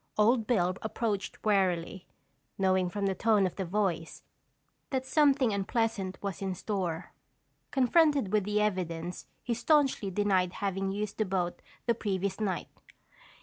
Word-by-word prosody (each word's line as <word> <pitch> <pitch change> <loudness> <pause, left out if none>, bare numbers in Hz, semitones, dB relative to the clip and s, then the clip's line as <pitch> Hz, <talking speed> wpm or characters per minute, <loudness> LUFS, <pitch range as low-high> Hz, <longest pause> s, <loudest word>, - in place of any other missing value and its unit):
Old 225 +1 +3
Bill 185 -7 +2
approached 220 -2 -3
warily, 190 -3 +1 0.5
knowing 185 -1 +2
from 200 +2 -2
the 195 - +1
tone 210 0 +3
of 185 - -2
the 190 - -3
voice, 175 -3 -2 0.7
that 260 -1 -1
something 270 -4 +3
unpleasant 200 -1 -1
was 200 -2 -4
in 190 -1 -2
store. 185 -4 -3 0.6
Confronted 275 - +3
with 210 -2 +3
the 210 +2 0
evidence, 180 -4 -2 0.2
he 240 - -1
staunchly 270 -3 +2
denied 190 -2 +1
having 195 -1 -2
used 205 +1 -4
the 215 - +2
boat 185 -2 -2 0.2
the 235 - +3
previous 195 -3 -2
night. 195 -4 -2
200 Hz, 140 wpm, -30 LUFS, 185-225 Hz, 0.7 s, Old